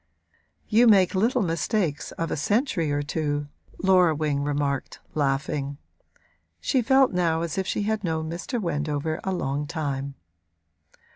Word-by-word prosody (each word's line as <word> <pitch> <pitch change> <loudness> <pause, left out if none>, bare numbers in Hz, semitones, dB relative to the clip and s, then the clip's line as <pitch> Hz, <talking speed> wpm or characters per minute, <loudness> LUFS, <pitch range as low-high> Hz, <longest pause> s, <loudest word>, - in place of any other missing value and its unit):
'You 235 +2 +5
make 195 -4 +5
little 230 +5 +2
mistakes 165 -1 -1
of 165 0 -3
a - - 0
century 180 - 0
or 145 0 0
two,' 145 -1 -2 0.3
Laura 180 -4 +5
Wing 145 -2 0
remarked, 145 -1 -2
laughing. 140 0 -1 0.8
She 260 - +1
felt 265 0 +4
now 165 -2 +1
as 170 -3 -3
if 190 -1 -2
she 205 - -1
had 215 0 -1
known 160 -2 -1
Mr. 175 - -3
Wendover 155 -2 -2
a 190 - -1
long 145 -4 -2
time. 140 -3 -3
160 Hz, 140 wpm, -25 LUFS, 145-190 Hz, 0.8 s, You